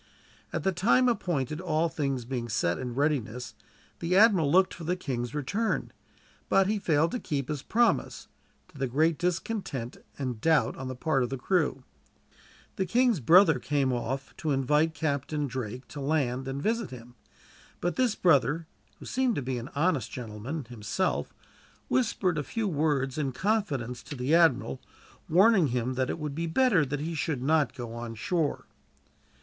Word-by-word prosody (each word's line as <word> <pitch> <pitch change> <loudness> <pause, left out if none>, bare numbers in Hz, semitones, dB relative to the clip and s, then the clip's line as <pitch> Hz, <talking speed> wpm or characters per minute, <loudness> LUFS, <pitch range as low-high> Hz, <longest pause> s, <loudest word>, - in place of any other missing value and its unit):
At - - -3
the 190 - +2
time 225 +8 +3
appointed, 160 - -1
all 165 -2 +1
things 135 -6 -2
being 120 -2 -4
set 85 -5 0
in 125 -2 -5
readiness, 125 -4 -1 0.5
the 180 +2 +1
admiral 195 -9 +5
looked 185 +2 +4
for 170 - -9
the 175 +3 0
king's 130 -6 -4
return; 200 - -1 0.6
but 195 - +4
he 210 +2 0
failed 160 -3 +2
to 250 - -2
keep 140 - -3
his 150 -3 -3
promise, 235 +7 +1 0.4
to 145 - -15
the 135 - 0
great 155 +5 +1
discontent 175 - -2 0.2
and 125 -5 -4
doubt 160 -2 +3
on 130 - -6
the 130 - -5
part 135 +1 0
of 120 - 0
the 135 - -3
crew. 145 -3 0 0.9
The 190 - 0
king's 240 0 +3
brother 160 - +6
came 135 -1 0
off, 135 +3 -4
to 160 - -3
invite 150 +4 +2
Captain 145 0 -1
Drake 125 -2 -5
to 145 - -7
land 135 -3 0
and 135 +1 -3
visit 230 +9 -1
him; 120 -1 -11 0.7
but 175 - -1
this 250 -4 +2
brother, 155 - +3 0.3
who - - -12
seemed 255 -3 0
to - - -1
be 125 -1 -2
an 120 +4 -8
honest 150 -2 +1
gentleman, 120 +5 -6
himself, 115 - -2 0.6
whispered 190 -9 +1
a - - -2
few 220 - -2
words 145 -5 0
in 135 -3 -1
confidence 140 - -1
to 145 - -8
the 130 +4 -1
admiral, 135 - +3 0.5
warning 190 0 +5
him 125 0 -1
that 130 0 -1
it - - -2
would 150 -3 -4
be 165 +3 -2
better 190 -1 +3
that 145 +2 -3
he 165 +2 -3
should 145 -4 -2
not 155 +1 +2
go 120 -4 -6
on 115 -1 -6
shore. 155 - -1
150 Hz, 170 wpm, -28 LUFS, 130-175 Hz, 0.9 s, brother